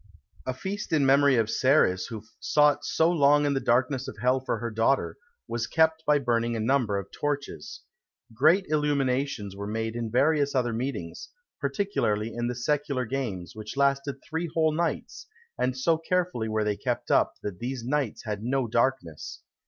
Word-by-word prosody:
A 130 - 0
feast 200 +9 -5
in 150 -4 +3
memory 140 0 +5
of 115 -2 +2
Ceres, 130 -8 +2
who 110 -3 -7 0.2
sought 150 -1 +3
so 160 +1 +2
long 145 -2 +4
in 145 - +2
the 135 - +1
darkness 130 +2 +1
of 105 - -7
hell 125 +4 +2
for 130 -3 -2
her 120 0 -4
daughter, 115 +5 +1 0.3
was 115 -1 -2
kept 160 0 +2
by 150 0 +5
burning 120 -3 0
a - - -2
number 115 -3 +1
of 100 0 -6
torches. 145 -1 -4 0.5
Great 160 - +4
illuminations 140 -8 0
were 100 +1 -5
made 110 +1 -3
in 115 -1 -3
various 140 +3 +2
other 120 -3 +1
meetings; 110 -9 -4 0.3
particularly 135 - -1
in 120 0 -2
the 125 - -3
Secular 140 +1 -1
Games, 110 -10 -4
which 110 +4 -8
lasted 140 0 +1
three 160 +2 -3
whole 160 -1 +3
nights; 165 +2 -3 0.3
and 130 0 -1
so 160 +5 +2
carefully 175 -9 -1
were 110 0 0
they 105 -1 0
kept - - -3
up, - - +3
that 95 -4 -5
these 125 0 -4
nights 135 -3 -1
had 105 -2 -3
no 130 +3 0
darkness. 115 - -1
130 Hz, 175 wpm, -27 LUFS, 115-145 Hz, 0.5 s, memory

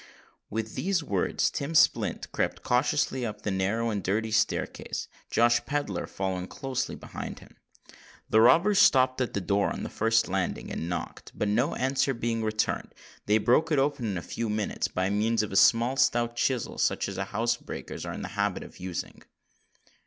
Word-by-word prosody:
With 110 0 -3
these 185 -3 0
words, 100 -9 0
Tim 145 +4 -4
Splint - - +3
crept - - -2
cautiously 130 +1 +1
up 105 -2 -5
the 105 - -1
narrow 105 +5 0
and 100 -2 -2
dirty 110 +3 -1
staircase, 110 0 -1 0.2
Josh 120 +1 +3
Pedler 145 0 -2
following 95 -1 -3
close 135 +2 -3
behind - - -7
him. - - -16 0.7
The 110 - +4
robbers 175 - +5
stopped 130 -1 +5
at 125 - -2
the - - +1
door 100 +2 +1
on - - -5
the - - -5
first 115 +1 +2
landing, 95 -1 -2
and 80 - -4
knocked; 85 - -5
but, 105 - -1
no 120 +6 +1
answer 135 +1 +1
being 115 -1 -1
returned, 110 0 -1 0.3
they 105 +1 +5
broke 125 +9 +2
it 150 - +3
open 140 -2 +1
in 100 -4 -2
a 85 - -5
few 115 -1 -4
moments 105 0 -1
by 95 +1 -1
means 110 +2 +1
of 105 - -5
a - - -4
small 120 +6 +5
stout 120 -1 +2
chisel 125 0 -1
such - - +1
as - - -6
housebreakers 115 +2 -3
are - - -4
in - - -6
the - - -5
habit - - -1
of - - -13
using. 90 -1 -5
115 Hz, 180 wpm, -28 LUFS, 105-130 Hz, 0.7 s, robbers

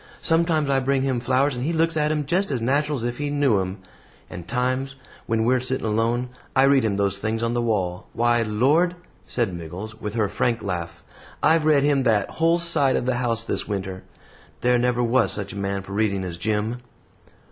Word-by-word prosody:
Sometimes 165 -2 +2
I 135 -1 +2
bring 135 0 0
him 130 -3 0
flowers, 130 +3 +1
and 125 - -4
he 155 - 0
looks 165 0 +1
at 150 -1 +1
'em 150 -1 -1
just 185 +7 +1
as 130 -4 -1
natural 145 +5 0
as 115 - -5
if 120 +2 -3
he 145 0 -2
knew 140 -8 +2
'em; 95 +1 -4 0.5
and 90 -1 -8
times, 130 +4 -1 0.3
when 115 -1 +1
we're 125 +2 +3
sitting 130 0 -2
alone, 115 +3 0 0.3
I 135 - +5
read 135 -1 +4
him 105 -3 0
those 100 -1 0
things 110 +2 -2
on 115 0 0
the 120 - 0
wall. 95 -6 -1
Why, 120 0 +2
Lord!" 135 +12 +2 0.3
said 115 -7 -1
Miggles, 90 +6 -8
with 105 +1 -4
her 110 -3 +1
frank 115 +3 -1
laugh, 90 -4 -4 0.4
"I've 160 0 +4
read 150 -3 +4
him 145 -2 +3
that 110 -5 +1
whole 165 +1 +2
side 160 -6 +3
of - - -1
the 130 -1 0
house 115 -2 -1
this - - -3
winter. 95 -2 -4 0.6
There 125 0 +3
never 125 0 +1
was 120 +2 +2
such 100 -1 -4
a - - -9
man 100 -1 -3
for 100 - -9
reading 100 -2 0
as 85 -2 -6
Jim." 110 +4 -1
120 Hz, 210 wpm, -23 LUFS, 105-140 Hz, 0.6 s, I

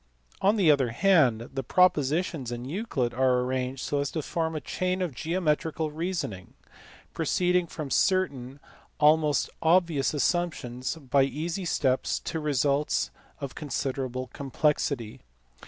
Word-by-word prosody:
On 200 +3 +4
the 185 -8 +5
other 135 -4 +2
hand, 125 - +3
the 135 - -2
propositions 155 -2 +1
in 120 0 -5
Euclid 140 - -2
are 125 0 +2
arranged 130 +1 -2
so 145 - -1
as 140 -1 -1
to 155 - -3
form 160 +1 -2
a - - -1
chain 185 +4 -2
of 180 -6 -2
geometrical 160 0 -1
reasoning, 160 - -4 0.6
proceeding 180 -1 +1
from 155 -4 -6
certain 140 -8 +1 0.4
almost 150 -1 +3
obvious 165 -4 +3
assumptions 140 -6 -1
by 140 -3 +1
easy 160 +7 -2
steps 130 -6 +1
to 160 - -3
results 145 -1 +1 0.3
of 140 -3 -5
considerable 130 -3 -3
complexity. 140 -4 -1
150 Hz, 125 wpm, -27 LUFS, 130-170 Hz, 0.6 s, the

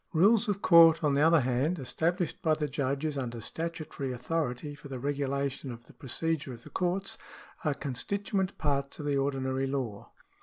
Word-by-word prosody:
Rules 210 +7 +5
of 200 -1 -1
court, 165 -1 +7
on 145 -2 +3
the 140 - +3
other 165 0 +6
hand, 130 +7 +1
established 165 +5 -1
by 155 -1 +3
the 150 -1 -1
judges 140 +1 -1
under 120 -3 -4
statutory 155 0 -4
authority 125 +1 -2
for 145 - -11
the 135 -2 -5
regulation 140 0 -2
of 120 0 -10
the - - -17
procedure 155 -1 -3
of 120 0 -11
the - - -13
courts, 185 +2 -1 0.4
are 150 -4 +1
constituent 190 - -2
parts 140 -2 -1
of 150 - -6
the 145 -1 +1
ordinary 135 -1 0
law. 130 -7 -3
145 Hz, 175 wpm, -30 LUFS, 135-165 Hz, 0.4 s, court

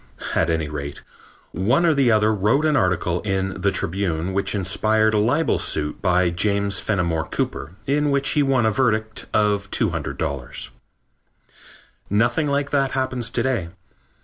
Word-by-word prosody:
At 80 - +1
any 80 -2 0
rate, 70 -1 -6 0.5
one 120 - +2
or 165 - +4
the 135 -4 +3
other 110 0 +3
wrote 110 +9 +2
an 155 -1 +2
article 90 - +1
in 95 -1 -2
The - - +3
Tribune 90 -1 -2
which 100 +1 0
inspired 110 +3 +1
a 105 - +3
libel 140 +10 +1
suit 75 -1 -1
by 90 -2 +2
James 100 +2 +1
Fenimore 85 -6 -1
Cooper 80 - -3
in 145 +2 +1
which 140 -1 +1
he 150 - +2
won 135 -4 +2
a 110 - +3
verdict 110 -2 0
of 105 -2 +1
$200. 65 -2 -3 1.4
Nothing 120 +9 +2
like 140 0 -1
that 135 -2 +1
happens 130 -3 -2
to - - -1
day. 120 -11 -1
105 Hz, 150 wpm, -22 LUFS, 90-130 Hz, 1.4 s, or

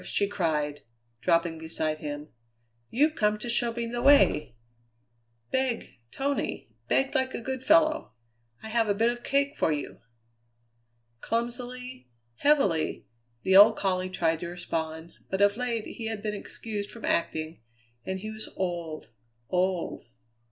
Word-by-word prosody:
she 200 - +1
cried, 150 -7 -1 0.4
dropping 165 +3 +1
beside 160 -1 -2
him; 150 0 -5 0.6
"You've 300 +6 +3
come 210 -6 +2
to 215 - -6
show 235 0 +2
me 235 0 -3
the 240 +1 -3
way. 275 - +5 1.0
Beg, 260 -3 0 0.2
Tony, 275 - -2 0.2
beg 270 - +2
like 260 -2 0
a - - -3
good 260 +2 -4
fellow. 315 +1 +4 0.5
I 220 - -6
have 225 0 +2
a 205 - +3
bit 230 +3 +3
of 240 0 -7
cake 280 +1 +1
for - - +2
you!" 150 -1 -4 1.2
Clumsily, 245 - -4 0.3
heavily, 200 - +2 0.4
the 190 - +3
old 210 +3 +9
collie 185 -1 0
tried 165 -3 +1
to 170 - -4
respond, 165 -1 -4 0.2
but 190 - -1
of 205 0 +5
late 235 -2 -2
he 225 - -6
had 220 -2 -4
been 210 -1 -1
excused 205 0 -5
from 230 - -8
acting; 160 -2 -1 0.4
and 190 +4 -4
he 215 +1 -5
was 220 0 -5
old, 170 -7 -3 0.4
old. 185 -1 0
210 Hz, 145 wpm, -28 LUFS, 170-245 Hz, 1.2 s, old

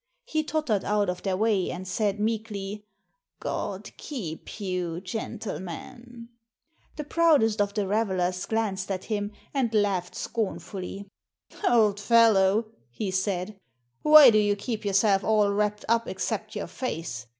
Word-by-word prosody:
He 315 -10 -1
tottered 300 -11 0
out 205 -2 +1
of 180 - -8
their 190 -2 -1
way 210 -3 +1
and 185 +2 -6
said 205 +2 -1
meekly, 210 -2 -3 0.3
" - - -55
God - - -4
keep 205 - -7
you, 180 -4 -2
gentle 215 +2 -5
men." 235 +6 -9 0.7
The 300 - -4
proudest 290 -9 +3
of 200 0 -1
the 205 -2 0
revelers 190 -3 0
glanced 205 -4 -1
at 185 -2 -3
him 205 -2 -2 0.2
and 260 -5 0
laughed 195 -4 +1
scornfully. 195 -2 -4 0.6
"Old 215 - +3
fellow," 215 -1 +4 0.2
he 190 - -4
said, 190 +1 -2 0.4
"why 300 -4 +9
do 215 - +4
you 205 -1 +2
keep 220 +2 -4
yourself 195 0 +3
all 210 -2 +3
wrapped 210 0 -1
up 230 0 +2
except - - -3
your - - -3
face? 155 - -5
205 Hz, 140 wpm, -26 LUFS, 190-225 Hz, 0.7 s, why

